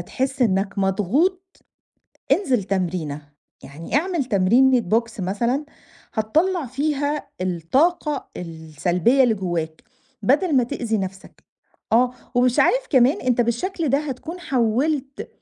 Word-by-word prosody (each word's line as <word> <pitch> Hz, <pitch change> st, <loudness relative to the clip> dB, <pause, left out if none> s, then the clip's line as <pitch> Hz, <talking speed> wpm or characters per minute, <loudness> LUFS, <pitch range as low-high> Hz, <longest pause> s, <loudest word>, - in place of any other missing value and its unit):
تحس 265 Hz, +8 st, -2 dB
إنك 200 Hz, -2 st, 0 dB
مضغوط، 275 Hz, -, 0 dB, 0.7 s
انزِل 260 Hz, -, +1 dB
تمرينة، 180 Hz, -6 st, -2 dB, 0.4 s
يعني 160 Hz, -, -5 dB
اعمل 335 Hz, -1 st, 0 dB
تمرينة 245 Hz, +4 st, +4 dB
box 230 Hz, -1 st, 0 dB
مثلًا 235 Hz, +10 st, -1 dB, 0.5 s
هتطلّع 315 Hz, -, +1 dB
فيها 290 Hz, +3 st, -2 dB
الطاقة 270 Hz, -, 0 dB
السلبية 170 Hz, -, 0 dB
اللي 240 Hz, -3 st, +3 dB
جوّاك، 170 Hz, -5 st, -4 dB, 0.4 s
بدَل 285 Hz, -, +2 dB
ما 250 Hz, -, +4 dB
تئذي 235 Hz, -4 st, -2 dB
نَفْسك، 190 Hz, 0 st, -7 dB, 0.5 s
آه، 245 Hz, +2 st, +4 dB, 0.2 s
ومش 245 Hz, 0 st, +2 dB
عارف -, -, +3 dB
كمان 265 Hz, +6 st, +4 dB
أنت 250 Hz, -1 st, +1 dB
بالشكل 305 Hz, -, -1 dB
ده 275 Hz, +2 st, +3 dB
هتكون 300 Hz, +4 st, -6 dB
حوّلت 270 Hz, +2 st, -1 dB
245 Hz, 115 wpm, -22 LUFS, 195-285 Hz, 0.7 s, تمرينة